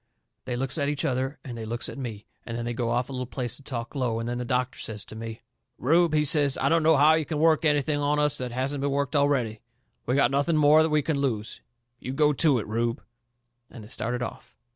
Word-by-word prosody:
They 125 - -3
looks 135 +5 0
at 140 0 +1
each 145 -1 -2
other 130 +2 -1
and 125 -4 -7
they 115 - -6
looks 115 +2 -3
at - - -7
me, 115 -7 -6 0.2
and 115 0 -5
then 120 - -4
they 120 - -2
go 120 -1 -2
off 120 +1 0
a - - -10
little 125 -2 -4
piece 125 -1 -4
and 140 - -19
talk 120 -3 -4
low, 125 -5 -1
and 115 0 -3
then 120 0 -3
the 125 - -3
doctor 125 +1 -1
says 105 -2 -4
to - - -10
me: 115 0 -7 0.3
"Rube," 165 +4 +3
he 150 0 +3
says, 145 -3 +3
"I - - +1
don't 165 0 +3
know 160 -1 +4
how 150 +3 +6
you 160 0 +2
can 150 +1 -4
work 160 +1 +3
anything 145 0 +2
on 145 +1 +1
us 150 -1 +2
that 125 -1 -4
hasn't 135 +3 -2
been 140 - 0
worked 140 +1 -1
already. 135 -7 +1 0.5
We've 125 +3 +1
got 135 -3 +4
nothing 145 +4 +1
more 155 +2 +5
we 150 -1 +2
can 150 -2 -1
lose. 110 -6 -2 0.4
You 130 - -5
go 150 +1 +3
to 145 -1 +3
it, 110 - -3
Rube." 115 +2 -2 0.7
And 115 - -11
they 105 - -13
started 120 0 -2
off. - - -8
135 Hz, 250 wpm, -26 LUFS, 120-150 Hz, 0.7 s, how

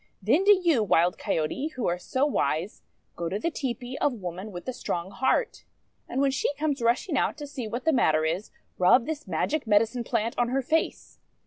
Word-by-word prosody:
Then 240 - +2
do 410 - +6
you, 320 -9 +3
Wild 180 -3 +2
Coyote, 160 - -1
who 255 - -2
are 175 +1 0
so 260 +8 0
wise, 170 - -1 0.3
go 170 -1 -3
to 190 - -2
the 335 +11 -1
tepee 255 -3 -4
of 290 - +2
Woman 185 0 -6
with 175 -2 -8
the 255 - -3
Strong 175 -4 -4
Heart, 450 - 0 0.5
and, 255 - -2
when 275 0 +3
she 265 - 0
comes 290 -2 -1
rushing 245 +7 +1
out - - 0
to 295 - -6
see 275 -5 -6
what 240 +6 -5
the 320 - +3
matter 155 - +3
is, 170 +6 -2 0.3
rub 205 +7 +5
this 310 0 -5
magic 305 -5 -1
medicine 225 +3 +2
plant 230 0 -1
on 240 -1 +2
her 270 +2 0
face. 320 +5 -1
240 Hz, 205 wpm, -27 LUFS, 190-280 Hz, 0.5 s, do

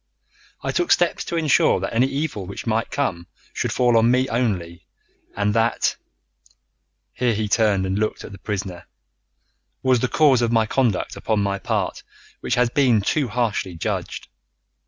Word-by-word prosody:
I - - -1
took 350 0 0
steps 175 -1 +2
to - - -4
insure 155 -10 +3
that 95 +4 -4
any 120 +3 +3
evil 135 - -3
which 100 - -7
might 115 0 0
come 90 -12 -2 0.3
should - - -2
fall 120 -2 +2
on 115 +1 +4
me 130 +1 +2
only, 95 -8 -2 0.5
and 105 0 +1
that" 115 +1 +1 1.2
here 120 -3 0
he 105 0 -1
turned 105 -3 +2
and 95 +2 -1
looked 110 0 -2
at - - -9
the 100 - -11
prisoner 95 -4 -5 1.0
"was 130 -2 +3
the 130 - 0
cause 135 -3 +4
of 115 -1 +1 0.2
conduct 120 -8 0
upon 105 -2 -1
my 100 -1 -1
part - - -2 0.4
which - - -1
has 120 -1 +2
been 125 -6 +3
too 140 +7 0
harshly 110 -6 -2
judged. 80 - -4
115 Hz, 160 wpm, -22 LUFS, 100-125 Hz, 1.2 s, on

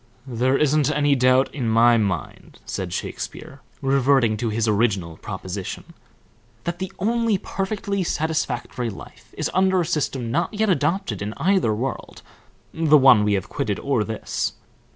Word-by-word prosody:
"There 130 +1 +1
isn't 150 -1 +2
any 145 -1 +2
doubt 130 0 +3
in 125 -6 -2
my 115 +2 +5
mind," 100 -5 -3
said - - -4
Shakespeare, 145 -3 -6 0.2
reverting 135 -4 +3
to 115 +1 -2
his 110 +1 0
original 100 -7 0
proposition, 95 -1 -6 0.7
"that 170 0 -4
the 190 0 -4
only 230 +1 +1
perfectly 200 +1 -3
satisfactory 155 -7 -2
life 100 - -12
is - - -2
under 190 0 +3
a - - -1
system 140 -7 -2
not 210 - -1
yet 215 -1 +2
adopted 190 - 0
in 105 +1 -4
either 180 - +2
world 130 +5 -5 0.5
the 155 -2 +5
one 130 -6 +6
we 105 0 +2
have 100 0 -1
quitted 105 -2 -2
or 135 -6 0
this. 110 0 -3
135 Hz, 150 wpm, -23 LUFS, 110-170 Hz, 0.7 s, one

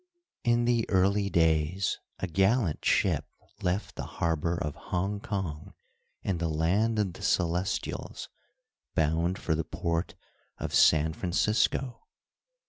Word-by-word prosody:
In 120 -1 +3
the 120 -2 +1
"early 100 +1 +2
days" 80 +2 +2 0.2
a - - -2
gallant 95 +1 +1
ship - - +2 0.4
left 90 +3 -1
the - - -6 0.2
harbor 85 +1 0
of 75 -5 -3
Hong 95 +3 -2
Kong, 95 -8 -4 0.5
in 95 -4 -1
the 85 - 0
land 95 +9 +1
of 100 -4 0
the - - -12
Celestials, 90 +1 -1 0.7
bound 80 +4 +1
for 85 - -1
the 80 +1 0
port 85 +2 -2 0.4
of - - -4
San 80 0 +5
Francisco. 110 +8 0
90 Hz, 125 wpm, -29 LUFS, 80-100 Hz, 0.7 s, San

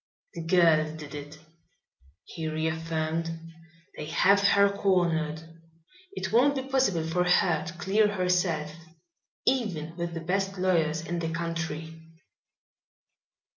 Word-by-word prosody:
"The 170 - -6
girl 165 -2 +3
did 150 -2 -9
it," 145 +1 -8 0.9
he 165 -2 -6
reaffirmed. 160 +1 -2 0.7
"They 150 - -6
have 200 +5 +4
her 200 0 +5
cornered. 170 -6 0 0.7
It 390 - -4
won't 275 +5 +4
be 265 - -2
possible 260 -12 +1
for 170 +2 +1
her 175 -3 +2
to 165 - -6
clear 195 +4 +2
herself, 180 -6 0 0.7
even 185 -12 0
with 170 -1 -4
the 165 - -4
best 195 +3 -1
lawyers 165 -4 +1
in 170 +1 -3
the 165 -1 -2
country." 165 -1 -4
170 Hz, 120 wpm, -27 LUFS, 160-190 Hz, 0.9 s, her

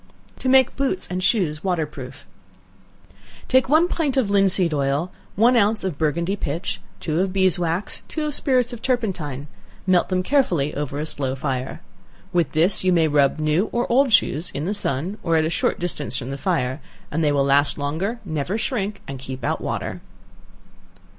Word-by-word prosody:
To 260 - -1
Make 260 -1 +5
Boots 275 +7 -1
and 185 +1 -2
Shoes 165 -9 +1
Water 175 -4 0
proof. 130 -4 -10 1.2
Take 260 0 +3
one 315 +4 +5
pint 305 -7 -1
of 225 -6 +2
linseed 190 -4 +3
oil, 140 +5 0 0.2
one 235 +5 +4
ounce 210 -1 +2
of 180 -7 -3
Burgundy 170 +5 0
pitch, 155 - -4 0.2
two 155 +1 -1
of 190 0 +1
beeswax, 185 -1 +1
and - - -22
two 310 -1 -2
of 300 - -2
spirits 255 -3 +1
of 235 - -8
turpentine; 180 - -2 0.4
melt 185 -2 +3
them 185 -1 0
carefully 180 - +1
over 145 -1 -3
a 150 - -2
slow 135 -4 -2
fire. 130 -1 -3 0.5
With 170 -5 +1
this 170 +6 +2
you 185 - +3
may 165 -3 +4
rub 145 -2 +3
new 155 +6 +1
or 240 +1 0
old 265 +1 +4
shoes 165 -5 +3
in 145 - -2
the 200 - -1
sun, 180 +1 -2
or 165 -1 +1
at 160 -1 +3
a 160 - -1
short - - 0
distance 150 -8 -2
from 130 +1 -4
the - - -3
fire, 135 -7 -1 0.3
and 160 +2 0
they 150 - +3
will 140 -1 +2
last 145 +1 +3
longer, 160 +11 -2
never 160 +4 -2
shrink, 215 -4 -3
and 135 -1 -6
keep 130 0 -7
out - - -1
water. - - -4
175 Hz, 185 wpm, -22 LUFS, 145-210 Hz, 1.2 s, Make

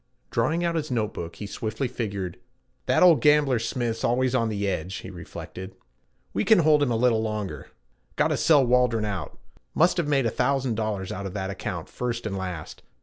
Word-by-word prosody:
Drawing 155 +9 +1
out 170 - +1
his 155 -2 -2
note 110 -4 -1
book 85 0 -6
he 105 - -7
swiftly 110 +5 -3
figured. 100 -7 -4 0.5
'That - - +4
old 165 -8 +7
gambler 150 -4 +4
Smith's 115 -1 -2
always 125 +2 +2
on 115 -3 +2
the 100 -1 -2
edge,' 95 0 -2
he 95 - -7
reflected. 95 +1 -9 0.6
'We 100 - 0
can 220 - +6
hold 150 -1 +5
him 145 - +2
a 120 - +1
little 115 -1 +3
longer. 105 -9 -4 0.5
Gotta - - +2
sell 145 -5 +5
Waldron 125 -3 +2
out. 100 -4 -4 0.4
Must 175 +3 +4
have 170 -4 0
made 140 -3 +2
a 115 - +1
thousand 130 0 +1
dollars 105 -4 -2
out 100 +1 -4
of 95 - -8
that 95 -1 -2
account - - -5
first 120 -2 -4
and 105 -2 -2
last. 90 -5 -6
115 Hz, 195 wpm, -26 LUFS, 100-130 Hz, 0.6 s, old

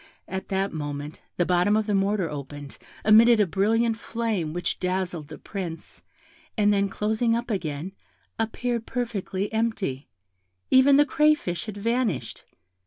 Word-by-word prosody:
At 190 0 -5
that 195 0 -1
moment 145 0 -5 0.2
the 175 - +2
bottom 180 +4 +3
of 220 - 0
the 210 - -1
mortar 195 -2 +1
opened, 145 -1 -8 0.3
emitted 225 +2 +7
a 210 - +5
brilliant 220 +5 +1
flame, 220 -11 -2
which 175 +1 -2
dazzled 180 -4 -2
the - - -9
Prince, 175 -5 -7 0.6
and 210 -1 +4
then 200 0 +1
closing 220 +3 0
up 235 0 -3
again, 165 -3 -3 0.5
appeared 230 +1 -2
perfectly 210 -4 -3
empty; 220 - -1 0.6
even 275 +2 +6
the 290 - +6
crayfish 290 - +1
had 210 -1 -6
vanished. 215 - -1
200 Hz, 140 wpm, -25 LUFS, 175-230 Hz, 0.6 s, emitted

